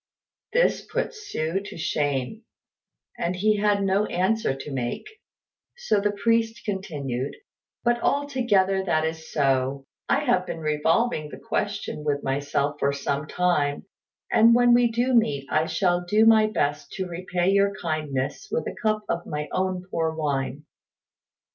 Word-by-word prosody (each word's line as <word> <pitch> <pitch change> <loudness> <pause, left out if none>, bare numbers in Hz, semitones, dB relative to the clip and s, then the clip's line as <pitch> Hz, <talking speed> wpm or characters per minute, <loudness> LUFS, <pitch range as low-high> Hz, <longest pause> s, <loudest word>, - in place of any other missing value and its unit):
This - - +2
put - - -2
Hsü 195 - -3
to - - -8
shame, 145 - -1 0.8
and 175 +2 -1
he 210 +3 +2
had 205 -1 +2
no 195 +2 +2
answer 190 -3 0
to 135 +2 -8
make; 125 -3 -3 0.7
so 215 - +1
the 205 - +2
priest 225 +2 0
continued, 145 - -3 0.5
"But 240 0 +2
although 280 -3 0 0.4
that 160 -4 +1
is 160 0 -5
so, 135 -1 +1 0.2
I 280 - +3
have 215 -9 +1
been - - -4
revolving 155 +4 +1
the - - -9
question 205 -7 -3
with 145 -1 -1
myself 140 +1 -1
for 140 - +2
some 140 +1 -2
time, 155 -6 0 0.5
and 230 +1 +6
when 245 0 +5
we 240 -1 +4
do 245 +3 +1
meet 145 - +2
I 155 +1 +2
shall 175 +2 +1
do 210 +5 +3
my 220 -1 +6
best 145 -8 -1
to 190 - -3
repay 180 +1 -1
your 200 0 +3
kindness 155 - -3
with 470 +3 -1
a - - -4
cup 215 -1 +1
of 170 - -2
my 150 0 -4
own 185 -1 -1
poor 160 -1 -1
wine." 145 -2 -2
175 Hz, 150 wpm, -25 LUFS, 145-215 Hz, 0.8 s, and